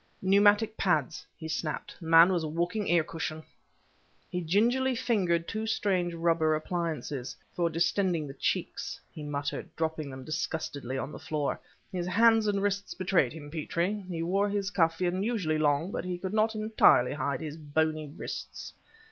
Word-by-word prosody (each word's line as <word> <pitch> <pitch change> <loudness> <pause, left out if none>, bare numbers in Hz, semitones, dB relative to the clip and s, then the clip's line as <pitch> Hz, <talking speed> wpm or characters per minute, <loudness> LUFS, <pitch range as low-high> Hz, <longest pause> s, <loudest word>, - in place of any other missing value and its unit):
"Pneumatic 205 +3 +4
pads!" 175 0 0
he 160 - -7
snapped. 155 -1 -3
"The 165 - -7
man 165 +3 +7
was 170 -2 0
a - - -2
walking 175 +6 -1
air 170 -1 +4
cushion!" 160 0 -5 0.9
He 180 - -2
gingerly 240 +10 +2
fingered 190 -9 +1
two 220 0 -3
strange 185 -5 0
rubber 165 -2 +2
appliances. 155 -5 -3 0.2
"For 170 -2 +1
distending 170 0 +1
the 135 - -7
cheeks," 135 - -2
he 155 - -9
muttered, 145 -1 -3
dropping 160 -2 -2
them 130 -1 -8
disgustedly 140 -3 -3
on 135 - -4
the - - -8
floor. 150 -2 -2 0.3
"His 180 -2 -3
hands 225 +3 +4
and 200 -1 +1
wrists 200 0 -1
betrayed 185 -8 +2
him, 145 -2 -9
Petrie. 170 +6 -2
He 165 -2 -3
wore 195 +4 +1
his 200 -1 -1
cuff 165 -4 +2
unusually 185 -3 0
long 150 +4 +2
but - - -3
he 180 0 -3
could 190 +2 -5
not 220 +1 +2
entirely 215 - +4
hide 140 +1 -2
his 155 -1 -5
bony 155 0 -1
wrists. 145 - -7
170 Hz, 165 wpm, -29 LUFS, 155-200 Hz, 0.9 s, man